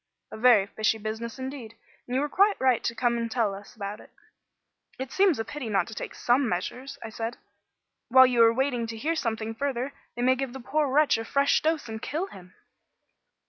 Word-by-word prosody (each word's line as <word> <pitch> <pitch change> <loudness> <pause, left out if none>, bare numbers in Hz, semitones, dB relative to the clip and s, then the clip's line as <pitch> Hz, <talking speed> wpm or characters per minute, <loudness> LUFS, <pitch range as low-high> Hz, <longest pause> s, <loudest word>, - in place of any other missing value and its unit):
"A - - -7
very 225 -4 +5
fishy 215 +2 0
business 220 +2 -5
indeed, 260 -4 -7 0.3
and 245 - -3
you 265 - +2
were 295 - 0
quite 400 +7 +3
right 255 -3 +2
to 230 - -1
come 235 0 +1
and 230 0 -2
tell 225 -3 0
us 200 +3 -11
about 205 0 -5
it." - - -15 0.9
"It 260 -1 -5
seems 385 -5 +3
a 225 - -3
pity 265 -2 -6
not 200 -2 +2
to - - -8
take - - -6
some 245 +1 +2
measures," 255 +10 -4
I 225 - -6
said. 225 +2 -5 0.7
"While 260 +1 +8
you 245 -2 +3
are 230 0 +7
waiting 245 -1 0
to 225 0 -6
hear 310 +9 -1
something 225 -5 -2
further, 270 +1 -2 0.2
they 240 - -2
may 255 +1 +5
give 260 -1 -4
the 265 - -7
poor 285 +4 0
wretch 295 -4 +4
a - - -3
fresh 280 +4 +2
dose 315 -4 0
and 220 -1 -6
kill 320 +6 -2
him." 185 - -14
240 Hz, 215 wpm, -27 LUFS, 225-270 Hz, 0.9 s, While